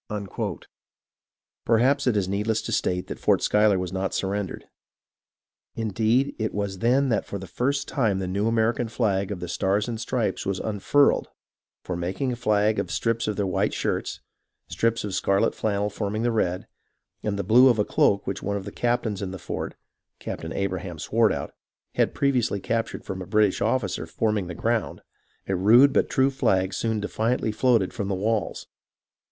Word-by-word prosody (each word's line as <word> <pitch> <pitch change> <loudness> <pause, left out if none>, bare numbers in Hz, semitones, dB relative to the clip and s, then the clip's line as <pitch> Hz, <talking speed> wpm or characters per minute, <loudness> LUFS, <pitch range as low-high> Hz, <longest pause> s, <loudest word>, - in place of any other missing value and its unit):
Perhaps 130 +5 +3
it 115 -4 +3
is 95 -3 0
needless 105 +3 -1
to - - -4
state 90 0 0
that - - -7
Fort - - +2
Schuyler 105 -1 +4
zvas 90 -1 -3
not 95 0 -2
surrendered. 100 0 -3 1.1
Indeed, 115 +5 +1
it 110 0 -2
was 100 -2 -3
then 130 +4 +3
that 110 -4 +1
for 100 - -4
the 95 - -7
first 140 +8 -1
time 110 -9 +1
the 95 - -2
new 100 +4 -1
American 115 +1 +1
flag 100 -4 0
of 95 - -5
the 90 - -4
stars 95 +4 0
and 115 -2 -4
stripes 115 -5 -1
was 95 -1 -2
un 105 -2 -3
furled; 145 +7 +3 0.6
for, 90 - -4
making 95 +10 -2
a - - -2
flag 105 -2 +2
of - - -2
strips 115 -1 -1
of 105 - -1
their 100 - 0
white 90 -2 0
shirts, - - -2 0.5
strips 115 0 0
of 105 -2 -4
scarlet 100 +1 +2
flannel 105 -1 -1
forming 105 +2 -2
the 120 - +2
red, 90 -5 0 0.6
and 105 -1 -2
the 100 - -1
blue 120 +7 +6
of 120 -3 +4
a 105 - +2
cloak 100 0 +2
which 95 - -3
one 100 0 -2
of 95 - -7
the 100 - -6
captains 120 -4 -1
in 95 - -3
the 95 - -6
fort - - -5 0.4
(Captain 80 - -6
Abra 95 -1 -1
ham 90 -2 -7
Swartout) 110 -3 0 0.4
had - - +1
previously 125 -7 +1
captured 115 +3 -2
from 95 0 -5
a 90 - -7
British 105 -1 +2
officer, 100 -10 0
forming 105 +2 -1
the 85 - -6
ground, 115 +2 -1 0.5
a 95 - 0
rude 115 +9 +6
but - - +2
true 135 +1 +2
flag 95 -7 +1
soon 110 +2 -1
defi 105 +1 -6
antly 115 -1 +1
floated 115 -5 +2
from 100 -4 -3
the 100 - -1
walls. 105 +2 -1
105 Hz, 185 wpm, -25 LUFS, 95-115 Hz, 1.1 s, blue